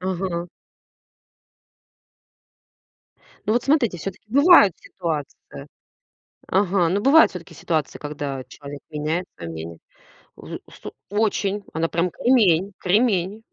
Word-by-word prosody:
Ага. 180 -2 -3 3.0
Ну, 215 - +1
вот 240 +1 +1
смотрите, 270 - +2
всё-таки 195 +3 -7
бывают 280 - +7
ситуации 155 -4 -5 1.2
Ага. 190 -2 +2
Ну, 190 +4 +1
бывают 290 +7 +6
всё-таки 180 -3 -10
ситуации, 155 -4 -2
когда 145 -3 -5
человек 145 0 -10
меняет 155 +4 -2
свое 85 -1 -7
мнение. 80 +1 -7 0.6
Взу - - -8
сту - - -10 0.2
очень. 205 -1 0
Она 160 +1 0
прям 170 +2 0
кремень, 200 -4 +2
кремень 200 0 +1
180 Hz, 105 wpm, -22 LUFS, 160-210 Hz, 3.0 s, бывают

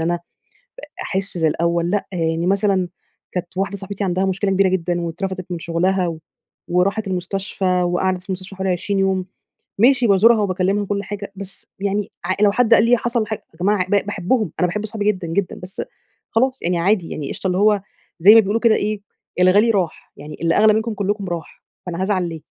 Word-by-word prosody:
أنا 170 +2 +1
أ - - -3 0.9
أحِسْ 195 -1 -3
زي 160 -2 +2
الأول 170 +2 0
لأ. 205 0 -1
يعني 165 -1 -1
مثلًا 195 -2 +1 0.4
كانت 180 0 -5
واحدة 195 +1 -1
صاحبتي 200 +1 -5
عندها 185 0 0
مشكلة 195 +1 0
كبيرة 190 0 +3
جدًا 175 -1 -1
واترفدِت 185 +2 -4
من 175 - -3
شغلها 175 +3 0
و 165 -2 -4 0.5
وراحت 195 +4 +1
المستشفى 190 +1 -3 0.2
وقعدت 180 +1 0
في 185 - -26
المستشفى 185 +1 -5
حوالي 190 0 -1
20 190 +3 -1
يوم، 190 -1 +1 0.5
ماشي، 250 +2 +5
بازورها 215 +3 +5
وباكّلمها 195 +1 0
وكل 200 0 -2
حاجة، 205 -1 -6
بس 195 0 -9
يعني 200 0 -1
ع 185 - 0
لو 205 -1 +5
حد 230 +1 +4
قال 220 - +5
لي 240 +1 +5
حصل 235 -1 -1
حاج 215 0 -3 0.2
يا - - -21
جماعة 190 0 +2
ب 205 0 +2
باحبهم، 205 - 0
أنا 180 - +4
باحب 210 +5 -3
صحابي 210 -1 -4
جدًا، 190 -4 0
جدًا 180 +3 -2
بس 185 +1 -6 0.5
خلاص 260 +3 +1
يعني 175 0 0
عادي 185 0 +1
يعني 145 -3 -5
قشطة، - - -6
اللي 180 0 +1
هو 205 -1 +3 0.4
زي 200 +6 +9
ما 225 - +9
بيقولوا 215 +2 0
كده 230 -2 +4
إيه، 210 0 -1 0.4
الغالي 200 +5 +5
راح، 185 -7 -2
يعني 150 +2 -9
اللي 165 0 +2
أغلى 215 +1 +6
منكم 220 +1 -1
كلكم 205 0 -2
راح، 170 -3 -6 0.2
فأنا 175 +1 -3
هازعل 190 -3 0
ليه؟ 165 -1 -7
190 Hz, 195 wpm, -20 LUFS, 180-205 Hz, 0.9 s, زي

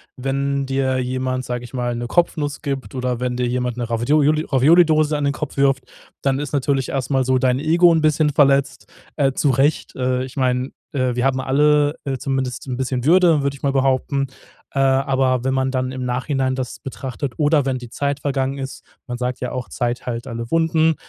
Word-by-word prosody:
wenn 140 +1 -1
dir 135 -1 0
jemand, 130 0 -2
sage 125 -1 -4
ich 120 - -13
mal, 120 -1 -1
'ne 120 0 -4
Kopfnuss 150 -1 0
gibt 135 -2 -4
oder 125 -2 -2
wenn 125 0 -2
dir 125 0 0
jemand 125 0 -1
'ne 120 -2 -4
Ravioli 150 +6 +2
Raviolidose 155 +2 +4
an 145 - -1
den 140 - +1
Kopf 145 0 -6
wirft, 135 -1 +2 0.4
dann 135 -1 +1
ist 145 -1 -5
natürlich 135 -1 0
erst 135 0 -3
mal 135 -1 +2
so 130 0 +2
dein 130 0 +2
Ego 170 +4 +4
'n 165 - +3
bisschen 155 0 +3
verletzt, 140 -1 +2 0.3
äh, 135 -3 +2
zurecht. 140 +2 +1
Äh, 125 0 0
ich 130 +2 -9
meine, 130 0 0 0.2
äh, 130 -3 0
wir 125 +1 0
haben 130 -1 +1
alle, 145 +2 +3
äh, 135 -2 -2
zumindest 130 0 -3
'n 125 -2 -3
bisschen 130 -1 -2
Würde, 165 0 +5
würde, 140 0 -1
ich - - -24
mal 140 -1 +1
behaupten. 135 +1 +1 0.5
Äh, 140 - -1
aber 130 -1 +2
wenn 130 - +1
man 130 0 0
dann 130 -1 -2
im 130 -1 -4
Nachhinein 130 +1 -1
das 130 -1 -5
betrachtet 135 0 -5
oder 150 -2 +3
wenn 135 -1 0
die 120 -1 -9
Zeit 140 +3 -2
vergangen 135 -1 -1
ist, 135 -1 -7 0.2
man 120 -1 -4
sagt 125 0 -3
ja 125 - -4
auch, 125 -1 -5
Zeit 120 -1 -2
heilt 120 +1 -4
alle 115 -1 -6
Wunden, 160 -1 +3
135 Hz, 205 wpm, -20 LUFS, 125-145 Hz, 0.5 s, Würde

